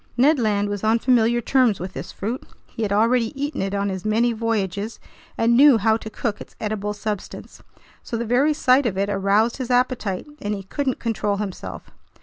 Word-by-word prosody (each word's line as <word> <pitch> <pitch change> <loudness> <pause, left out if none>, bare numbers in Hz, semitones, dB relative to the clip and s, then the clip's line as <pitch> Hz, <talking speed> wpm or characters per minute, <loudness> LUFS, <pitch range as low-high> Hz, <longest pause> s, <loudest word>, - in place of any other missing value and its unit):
Ned 280 +4 +4
Land 205 -3 +1
was 205 0 -4
on 220 +1 +3
familiar 240 -1 +2
terms 245 -4 +2
with 185 +1 -6
this 145 +7 -7
fruit. 230 +6 -4 0.2
He - - -9
had 210 -2 -1
already 230 +5 +2
eaten 290 +2 -2
it 195 +1 -2
on 200 0 0
his 190 -1 -4
many 230 +3 +2
voyages 215 -2 -2 0.4
and 230 +1 +3
knew 275 -1 +7
how 220 +1 +3
to 220 - -8
cook 215 -1 -3
its - - -12
edible 210 -1 -2
substance. 210 -1 -6 0.4
So 235 - -4
the 235 - -2
very 270 +6 +2
sight 260 -2 +3
of 190 -4 -3
it 200 +1 0
aroused 200 +4 +2
his 260 -2 -5
appetite, 245 -6 0 0.2
and 205 0 -2
he 195 - -7
couldn't 265 +6 -2
control 210 -3 -1
himself. 180 - -6
220 Hz, 195 wpm, -22 LUFS, 200-245 Hz, 0.4 s, knew